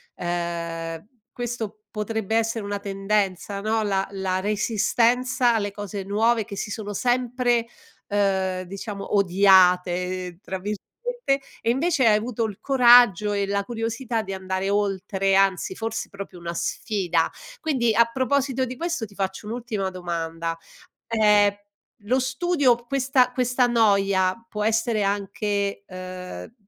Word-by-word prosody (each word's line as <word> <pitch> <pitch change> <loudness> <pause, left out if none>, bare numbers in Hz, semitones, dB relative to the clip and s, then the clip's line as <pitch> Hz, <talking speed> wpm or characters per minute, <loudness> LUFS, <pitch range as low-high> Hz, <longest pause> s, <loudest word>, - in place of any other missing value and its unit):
ehm, 170 -1 -4 0.3
questo 225 -3 -5
potrebbe 220 0 -2
essere 225 -1 0
una 205 0 -3
tendenza, 195 0 -1
no. 220 +1 0
La 195 -2 0
la 190 -1 -1
resistenza 230 +4 +2
alle 205 -2 -1
cose 205 0 -6
nuove, 220 +3 +1
che 200 - -8
si 205 - -4
sono 205 -2 -5
sempre, 245 0 +1 0.4
ehm, 190 -2 0
diciamo 195 +2 -5
"odiate" 180 -2 +3
tra 190 -2 -5
virgolette, 205 +1 -4 0.8
e 230 - -1
invece 280 +1 +2
hai 210 - +6
avuto 230 +1 -2
il 205 -3 -6
coraggio 240 -6 +6
e 200 -1 0
la 200 0 0
curiosità 225 +1 -2
di 195 -2 -6
andare 190 +1 -2
oltre, 195 -1 0
anzi 195 -1 +2
forse 225 +1 -4
proprio 200 -2 -9
una 170 0 -5
sfida. 175 -2 -1 0.3
Quindi 240 -7 +1
a 235 0 +6
proposito 265 0 0
di 255 0 -6
questo 335 -5 -2
ti 200 - -16
faccio 195 +2 -3
un'ultima 225 -4 -3
domanda. 165 -2 -4 0.5
Ehm, 210 -2 +4 0.5
lo 255 +5 +1
studio 260 +1 +2
questa 265 -1 +2
questa 250 0 +2
noia 200 -5 +3
può 210 0 -3
essere 225 0 +1
anche, 200 0 -1
ehm, 185 - -8
205 Hz, 130 wpm, -24 LUFS, 190-235 Hz, 0.8 s, hai